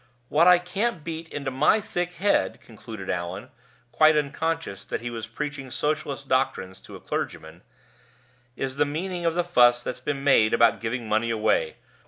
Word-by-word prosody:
What 165 +4 +4
I 180 -1 +8
can't 180 +1 -2
beat 160 0 -6
into 140 -2 -4
my 150 +11 +3
thick 180 -5 -3
head," 195 +4 +1
concluded 110 -3 -10
Allan, 90 +7 -4 0.4
quite 155 +5 +5
unconscious 150 -5 -2
that - - -4
he 120 0 -5
was 115 -2 -6
preaching 140 +2 -5
socialist 150 0 -2
doctrines 130 -8 -1
to - - -13
a - - -9
clergyman; 80 +2 -5 0.9
"is 135 0 -4
the 145 - +4
meaning 175 +4 -3
of 165 - 0
the 175 - +1
fuss 120 -8 +4
that's 125 - -5
made 135 -6 +3
about 115 0 +4
giving 115 +1 -3
money 110 +2 +1
away. 455 - +1
140 Hz, 165 wpm, -25 LUFS, 115-165 Hz, 0.9 s, I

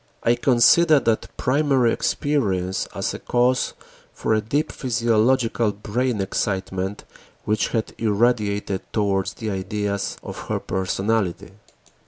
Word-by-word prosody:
I 115 - +4
considered 140 +6 +4
that 115 -1 +1
primary 135 -3 +2
experience 95 -11 -1
as - - -2
cause 125 +1 +2 0.4
for - - -1
a 110 - +2
deep 140 +8 -1
physiological 115 -1 +1
brain 110 +2 -1
excitement 95 0 -2 0.4
which 105 0 +1
had 110 -1 -2
irradiated 105 -3 +1
towards 100 -3 0
the 110 -2 -4
ideas 100 +1 -2
of - - -8
her - - -1
personality. 95 0 -1
110 Hz, 110 wpm, -23 LUFS, 100-125 Hz, 0.4 s, I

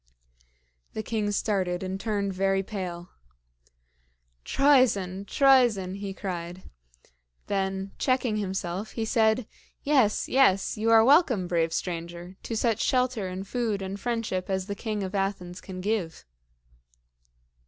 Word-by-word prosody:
The 220 - -4
king 215 -1 -1
started 190 -3 -1
and 190 +1 -4
turned 200 -2 -1
very 195 +1 +1
pale. 180 -3 -6 1.3
"Troezen! 205 - +3
Troezen!" 240 -9 +3
he 200 -1 -5
cried. 180 -2 -6 0.8
Then 195 0 -2
checking 255 -4 +1
himself, 190 0 -3
he 225 - -2
said, 220 0 +2 0.4
"Yes! 265 -8 +2
yes! 225 -8 +3
You 220 +1 0
are 225 0 +7
welcome, 265 - +4
brave 165 -2 +1
stranger, 170 +1 -5
to 225 - -4
such 225 -1 +1
shelter 250 -6 +1
and 185 +2 -6
food 220 -4 -1
and 195 +1 -5
friendship 230 -6 -2
as 190 -1 -1
the 200 - -4
King 210 0 -3
of 190 +1 -5
Athens 195 -3 -3
can 185 -1 -7
give." 195 -5 -2
200 Hz, 125 wpm, -27 LUFS, 185-225 Hz, 1.3 s, are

